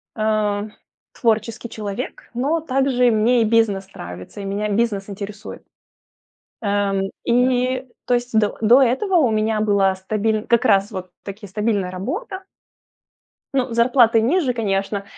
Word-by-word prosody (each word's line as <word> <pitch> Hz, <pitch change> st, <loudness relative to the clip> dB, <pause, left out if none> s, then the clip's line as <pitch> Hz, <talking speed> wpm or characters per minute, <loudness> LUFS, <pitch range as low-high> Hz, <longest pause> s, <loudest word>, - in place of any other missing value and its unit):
э, 215 Hz, -1 st, 0 dB, 0.4 s
творческий 230 Hz, 0 st, -1 dB
человек, 210 Hz, +3 st, -6 dB
но 285 Hz, +7 st, 0 dB
также 260 Hz, -4 st, +2 dB
мне 230 Hz, +3 st, +3 dB
и 225 Hz, -, +3 dB
бизнес 210 Hz, -4 st, +2 dB
нравится, 90 Hz, -, -9 dB
и 200 Hz, -, -6 dB
меня 205 Hz, +2 st, -2 dB
бизнес 205 Hz, -2 st, 0 dB
интересует. 200 Hz, +1 st, -8 dB, 1.0 s
Эм, 200 Hz, -1 st, 0 dB
и 255 Hz, +1 st, +1 dB, 0.2 s
то 245 Hz, -, +2 dB
есть 240 Hz, -1 st, -1 dB
до 210 Hz, -1 st, 0 dB
до 235 Hz, +5 st, +6 dB
этого 270 Hz, -, +1 dB
у 275 Hz, -9 st, +4 dB
меня 215 Hz, 0 st, 0 dB
была 200 Hz, -3 st, +2 dB
стабиль 215 Hz, +3 st, -1 dB
как 235 Hz, -2 st, +3 dB
раз 200 Hz, -1 st, +3 dB
вот 185 Hz, -3 st, -7 dB
таки 205 Hz, +1 st, -8 dB
стабильная 205 Hz, -2 st, -1 dB
работа. 380 Hz, -, -5 dB, 1.1 s
Ну, 260 Hz, -2 st, 0 dB
зарплаты 235 Hz, -1 st, +4 dB
ниже, 265 Hz, +2 st, +1 dB
конечно, 200 Hz, -2 st, -2 dB
220 Hz, 135 wpm, -21 LUFS, 200-245 Hz, 1.1 s, до